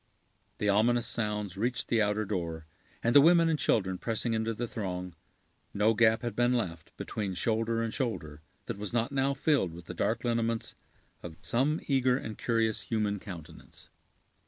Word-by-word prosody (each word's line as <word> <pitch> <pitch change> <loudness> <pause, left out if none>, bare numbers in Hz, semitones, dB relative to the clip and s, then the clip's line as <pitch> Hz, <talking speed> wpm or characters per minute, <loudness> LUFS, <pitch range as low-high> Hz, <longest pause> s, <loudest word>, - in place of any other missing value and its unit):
The 105 - -1
ominous 115 +4 +3
sounds 105 -4 -2
reached 120 +4 -1
the 115 -2 +2
outer 105 +1 +1
door, 85 -5 -3 0.4
and 115 - +2
the 145 - +9
women 165 +1 +6
and 155 -2 +1
children 95 -7 +1
pressing 115 0 -1
into 110 0 0
the 120 +2 -3
throng, 90 -5 -4 0.6
no 105 +2 +4
gap 110 +1 +3
had 120 - -3
been 120 +1 +3
left, 85 -10 -3
between 100 -4 -4
shoulder 115 +4 0
and 115 - -3
shoulder, 85 - -3 0.2
that 110 -3 -5
was 105 0 -5
not 120 +1 +1
now 140 0 +1
filled 135 - +1
with 85 0 -11
the - - -7
dark - - -1
lineaments 115 -1 -1 0.5
of 80 -2 -9
some 140 +7 +1
eager 130 -2 +2
and 110 -5 -7
curious 115 -2 +1
human 105 0 -1
countenance. 85 -5 -11
110 Hz, 170 wpm, -30 LUFS, 100-120 Hz, 0.6 s, the